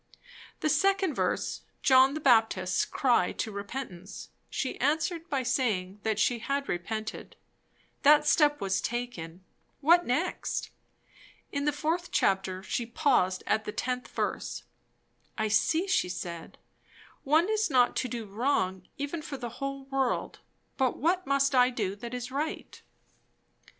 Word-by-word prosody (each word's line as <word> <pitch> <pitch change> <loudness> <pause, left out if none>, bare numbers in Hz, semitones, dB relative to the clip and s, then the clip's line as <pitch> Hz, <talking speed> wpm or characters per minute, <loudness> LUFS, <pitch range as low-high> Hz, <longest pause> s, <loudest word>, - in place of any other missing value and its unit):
The 310 - +1
second 385 +2 +2
verse, - - -1 0.2
John 265 +1 +6
the - - -2
Baptist's 220 -9 +3
cry 240 -9 +2
to 220 - -3
repentance, 200 -2 -7 0.2
she 260 - -3
answered 320 +4 0
by 270 -2 0
saying 210 -7 -1
that 220 -1 -1
she 235 +2 +2
had 275 +4 -2
repented; 215 +5 -4 0.7
that 300 +1 +6
step 295 -1 +4
was 195 -1 0
taken; 190 -8 -5 0.4
what 340 +4 +5
next? 305 +8 -2 0.8
In 280 0 -2
the 295 - +3
fourth 320 +4 -2
chapter 190 -1 +1
she 235 +3 -2
paused 230 - +1
at 220 0 +1
the - - -3
10th 250 0 -2
verse. - - -3 0.7
I 220 -1 0
see, 315 - +2
she 365 - +1
said, 170 -2 -6 0.7
one 310 +6 +3
is 435 -2 +1
not 250 -3 +3
to 255 - 0
do 235 -2 -5
wrong 195 -4 -1
even 285 +3 -3
for 290 -2 -6
the 240 -2 -5
whole 275 0 -3
world; 270 -2 -1 0.4
but 260 -2 +1
what 360 +5 +1
must 275 0 +2
I 250 -1 +5
do 205 -6 -2
that 235 +3 -6
is 245 0 -5
_right? 290 +4 -4
255 Hz, 140 wpm, -29 LUFS, 215-295 Hz, 0.8 s, John